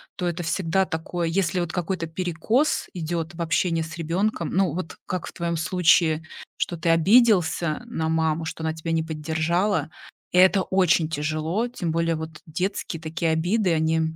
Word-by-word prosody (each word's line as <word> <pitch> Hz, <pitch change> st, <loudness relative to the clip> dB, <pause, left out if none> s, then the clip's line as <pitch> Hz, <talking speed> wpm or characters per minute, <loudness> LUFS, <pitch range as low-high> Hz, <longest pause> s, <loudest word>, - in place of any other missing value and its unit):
то 180 Hz, -, -3 dB
это 175 Hz, +1 st, -2 dB
всегда 190 Hz, +2 st, +1 dB
такое, 165 Hz, +1 st, -3 dB
если 180 Hz, +1 st, 0 dB
вот 170 Hz, -1 st, -2 dB
какой-то 180 Hz, -1 st, -2 dB
перекос 180 Hz, -, 0 dB
идет 170 Hz, -1 st, -3 dB
в 170 Hz, -, -6 dB
общении 165 Hz, 0 st, +1 dB
с 160 Hz, +1 st, -8 dB
ребенком, 170 Hz, +2 st, -1 dB
ну, 190 Hz, -4 st, +1 dB
вот 175 Hz, -2 st, -5 dB
как 180 Hz, -2 st, -3 dB
в -, -, -9 dB
твоем 170 Hz, -1 st, -2 dB
случае, 165 Hz, -2 st, +3 dB, 0.3 s
что 175 Hz, -, -1 dB
ты 165 Hz, +1 st, -1 dB
обиделся 175 Hz, -2 st, +4 dB
на 160 Hz, -9 st, -2 dB
маму, 160 Hz, 0 st, +1 dB
что 160 Hz, 0 st, -5 dB
она 160 Hz, 0 st, 0 dB
тебя 165 Hz, +1 st, -5 dB
не 160 Hz, -1 st, +1 dB
поддержала. 160 Hz, +2 st, 0 dB, 0.4 s
И 180 Hz, -, 0 dB
это 185 Hz, +1 st, +6 dB
очень 180 Hz, -4 st, +2 dB
тяжело. 155 Hz, +8 st, -1 dB
Тем 175 Hz, -9 st, -3 dB
более, 165 Hz, 0 st, +1 dB
вот 160 Hz, 0 st, -7 dB
детские 170 Hz, 0 st, -3 dB
такие 165 Hz, +1 st, -1 dB
обиды, 180 Hz, +3 st, +1 dB
они 160 Hz, 0 st, +1 dB
165 Hz, 170 wpm, -24 LUFS, 160-180 Hz, 0.4 s, это